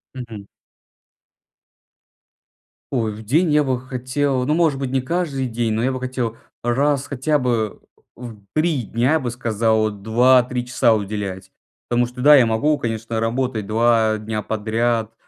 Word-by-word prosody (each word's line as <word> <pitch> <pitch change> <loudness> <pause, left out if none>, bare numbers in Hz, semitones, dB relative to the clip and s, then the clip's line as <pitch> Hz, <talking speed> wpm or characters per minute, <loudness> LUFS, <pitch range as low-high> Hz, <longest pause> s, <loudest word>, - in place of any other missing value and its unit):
Мгм. 115 -5 -8 2.4
Ой, 115 -5 -1
в 110 +2 -10
день 150 - +2
я 150 - +4
бы 130 -3 -1
хотел, 130 +1 -2
ну, 150 - +1
может 160 -4 +2
быть, 135 -1 -3
не 130 0 0
каждый 145 -2 -2
день, 115 -1 -1
но 110 +1 0
я 130 +2 0
бы 130 - -4
хотел 125 -3 -3 0.3
раз 140 +3 +1
хотя 145 +2 0
бы, 115 -5 -1 0.4
в 115 -4 -9
3 155 -4 +1
дня, 120 +6 0
я 160 - +3
бы 120 -2 -3
сказал, 110 -2 +1
2-3 125 +4 +2
часа 115 -2 +2
уделять. 100 -2 -4 0.4
Потому 120 0 +2
что, 125 +1 -8
да, 150 +2 +8
я 130 -4 +6
могу, 115 +7 +1
конечно, 115 -1 -3
работать 115 -2 -1
2 110 0 +2
дня 105 0 -4
подряд, 110 +1 -1
120 Hz, 155 wpm, -21 LUFS, 110-130 Hz, 2.4 s, да